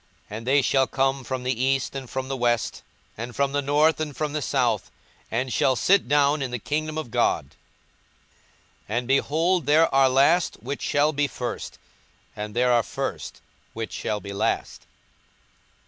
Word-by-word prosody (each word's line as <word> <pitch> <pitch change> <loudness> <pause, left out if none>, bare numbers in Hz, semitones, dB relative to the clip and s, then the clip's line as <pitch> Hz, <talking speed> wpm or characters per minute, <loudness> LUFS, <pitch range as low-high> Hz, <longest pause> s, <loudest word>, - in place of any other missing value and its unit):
42:013:029 105 - -4
And 115 - -12
they 140 +2 +4
shall 135 0 +3
come 135 0 0
from 130 0 -4
the 125 -1 -1
east, 135 0 0
and 135 -3 -6
from 130 0 -4
the 135 - -3
west, 120 -2 0 0.4
and 120 +1 -6
from 140 -1 +1
the 145 0 0
north, 150 +3 +3
and 150 -3 -4
from 150 -1 -2
the 150 - -2
south, 120 -8 0 0.4
and 125 +2 -2
shall 130 - +3
sit 190 +4 +3
down 145 +1 +3
in 135 - -2
the 125 - -3
kingdom 155 +6 -3
of 155 -7 -5
God. - - +1 1.4
42:013:030 110 - -1
And, 120 0 -2
behold, 160 +5 +2
there 155 +1 +4
are 135 -1 +5
last 140 +7 +3
which 135 +6 -6
shall 150 +2 +2
be 145 0 +1
first, 125 -3 -5 0.6
and 105 0 -6
there 125 +1 +3
are 120 -1 +4
first - - -5 0.3
which 115 0 -5
shall 105 - -2
be 100 -1 -8
last. 100 +2 -2
135 Hz, 180 wpm, -24 LUFS, 120-145 Hz, 1.4 s, are